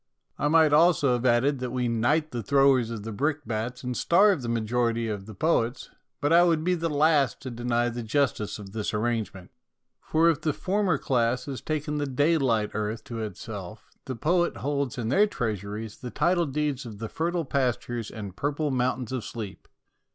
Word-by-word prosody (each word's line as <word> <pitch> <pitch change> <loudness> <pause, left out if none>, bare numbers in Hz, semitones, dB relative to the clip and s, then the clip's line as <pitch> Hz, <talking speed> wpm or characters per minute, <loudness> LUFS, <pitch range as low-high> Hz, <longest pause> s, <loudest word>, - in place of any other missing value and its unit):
I 145 - +1
might 155 -1 +5
almost 165 +1 +5
have 125 -2 +2
added 130 +3 +3
that 125 0 -3
we 125 0 -1
knight 145 +7 +1
the 120 - -3
throwers 135 0 +3
of 115 -3 -5
brick 145 +3 -1
bats 120 +3 -4
and 125 0 -3
starve 190 - +4
the 120 - -4
majority 115 0 0
of 105 -2 -4
the 110 - -9
poets, 135 -5 0 0.3
but 145 +3 +1
I 170 - +7
would 165 -3 +2
be 180 +2 +2
the 165 -1 -1
last 150 -2 +2
to 130 - -6
deny 120 0 0
the 120 0 -4
justice 115 -2 0
of 100 -2 -10
this 110 0 -3
arrangement, 110 -4 -2 0.5
for 160 +1 +2
if 165 -2 +2
the 155 -1 0
former 190 -2 0
class 125 -1 0
has 135 -5 -5
taken 150 -1 -2
the 145 - -1
day 145 +5 +2
light 115 -6 +1
earth 110 +1 -3
to 115 -1 -6
itself, 105 -4 -7
the 130 - -4
poets 175 +7 +1
hold 140 -3 -1
in 115 -2 -2
their 205 - +4
treasuries 105 - -4
the 125 - -6
title 175 +4 +1
deeds 145 -1 -1
of 110 -4 -9
the 115 +2 -5
fertile 170 +5 -2
pastures 120 -4 -1
and 100 -4 -8
purple 145 +4 -1
mountains 125 -1 -1
of 130 -4 -3
sleep. 105 -3 -7
125 Hz, 190 wpm, -26 LUFS, 115-150 Hz, 0.5 s, I